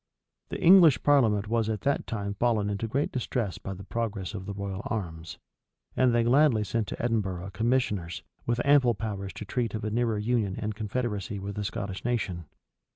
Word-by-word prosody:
The -, -, -4 dB
English 170 Hz, -8 st, +7 dB
parliament 110 Hz, -8 st, +3 dB
was 115 Hz, 0 st, 0 dB
at 110 Hz, -2 st, -2 dB
that 140 Hz, -, 0 dB
time 100 Hz, -3 st, -3 dB
fallen 105 Hz, -1 st, +1 dB
into 100 Hz, +3 st, -2 dB
great 135 Hz, +6 st, -1 dB
distress 120 Hz, -5 st, -2 dB
by 95 Hz, -, -6 dB
the 95 Hz, -, -9 dB
progress 105 Hz, -3 st, -3 dB
of 95 Hz, -2 st, -6 dB
the 100 Hz, -, -3 dB
royal 100 Hz, -1 st, -4 dB
arms; 85 Hz, -7 st, -4 dB, 0.6 s
and 130 Hz, -1 st, +4 dB
they 120 Hz, 0 st, +3 dB
gladly 125 Hz, -2 st, +4 dB
sent 110 Hz, 0 st, -1 dB
to -, -, -6 dB
Edinburgh 95 Hz, -6 st, -1 dB
commissioners, 105 Hz, -6 st, -1 dB, 0.2 s
with 120 Hz, 0 st, +1 dB
ample 135 Hz, -5 st, +5 dB
powers 100 Hz, -2 st, -4 dB
to 105 Hz, -, -7 dB
treat 115 Hz, +1 st, -2 dB
of 110 Hz, -, -4 dB
a 105 Hz, -, -2 dB
nearer 115 Hz, -1 st, +1 dB
union 105 Hz, -3 st, 0 dB
and 105 Hz, 0 st, -3 dB
confederacy 105 Hz, -1 st, -3 dB
with 100 Hz, +1 st, -5 dB
the 105 Hz, -, -3 dB
Scottish 100 Hz, -2 st, -4 dB
nation. 100 Hz, -8 st, -2 dB
110 Hz, 185 wpm, -28 LUFS, 100-120 Hz, 0.6 s, English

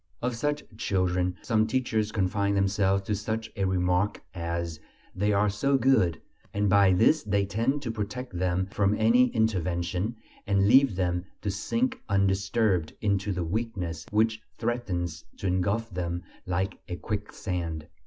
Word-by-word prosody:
Of 125 Hz, 0 st, -1 dB
such 145 Hz, +4 st, -1 dB
children 90 Hz, -3 st, 0 dB
some 110 Hz, -2 st, +2 dB
teachers 110 Hz, -3 st, 0 dB
confine 100 Hz, 0 st, +1 dB
themselves 95 Hz, 0 st, +2 dB
to 105 Hz, -, -2 dB
such 110 Hz, +2 st, -3 dB
a 100 Hz, -, 0 dB
remark 90 Hz, +1 st, +1 dB
as: 85 Hz, -2 st, -3 dB, 0.3 s
"They 105 Hz, +3 st, +1 dB
are 105 Hz, +1 st, +3 dB
so 135 Hz, +8 st, +2 dB
good," 115 Hz, -, +3 dB, 0.4 s
and 105 Hz, 0 st, +2 dB
by 100 Hz, 0 st, +5 dB
this 135 Hz, -, +4 dB
they 100 Hz, -1 st, +1 dB
tend 120 Hz, +8 st, 0 dB
to 115 Hz, -, -2 dB
protect 115 Hz, +1 st, -5 dB
them 90 Hz, +1 st, 0 dB
from 100 Hz, 0 st, +2 dB
any 120 Hz, +3 st, +5 dB
intervention, 95 Hz, -2 st, 0 dB, 0.3 s
and 100 Hz, -1 st, +3 dB
leave 130 Hz, -2 st, +6 dB
them 90 Hz, -1 st, 0 dB, 0.2 s
to 105 Hz, -, 0 dB
sink 240 Hz, -, -1 dB
undisturbed 95 Hz, -2 st, +1 dB
into 100 Hz, -1 st, 0 dB
the 90 Hz, -2 st, -1 dB
weakness 90 Hz, -4 st, -3 dB
which 110 Hz, +1 st, +2 dB, 0.2 s
threatens 95 Hz, -9 st, -2 dB
to -, -, -7 dB
engulf 95 Hz, +5 st, +1 dB
them 85 Hz, -1 st, -3 dB, 0.2 s
like 95 Hz, +1 st, -1 dB
a 90 Hz, -, -2 dB
quicksand. 90 Hz, -4 st, -4 dB
100 Hz, 145 wpm, -28 LUFS, 90-110 Hz, 0.4 s, leave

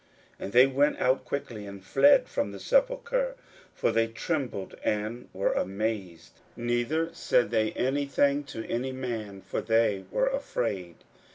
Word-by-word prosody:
41:016:008 -, -, -5 dB
And 100 Hz, -, -7 dB
they 125 Hz, +2 st, +8 dB
went 140 Hz, +2 st, +2 dB
out 130 Hz, +1 st, +2 dB
quickly, 115 Hz, -7 st, -5 dB
and 100 Hz, -1 st, -9 dB
fled 290 Hz, -, +5 dB
from -, -, -2 dB
the -, -, -8 dB
sepulchre; -, -, +1 dB, 0.4 s
for -, -, +1 dB
they 115 Hz, 0 st, +2 dB
trembled 120 Hz, -, -3 dB
and 110 Hz, +3 st, -2 dB
were 95 Hz, -, 0 dB
amazed: 95 Hz, -3 st, -3 dB, 0.2 s
neither 120 Hz, +8 st, 0 dB
said 120 Hz, -, +1 dB
they 110 Hz, -2 st, +2 dB
any 140 Hz, +3 st, 0 dB
thing 140 Hz, +1 st, +2 dB
to 115 Hz, -4 st, -6 dB
any 125 Hz, +3 st, -2 dB
man; 115 Hz, -7 st, -5 dB
for -, -, -3 dB
they 110 Hz, -4 st, +2 dB
were 265 Hz, -, +1 dB
afraid. 115 Hz, -, -2 dB
120 Hz, 155 wpm, -28 LUFS, 105-145 Hz, 0.4 s, they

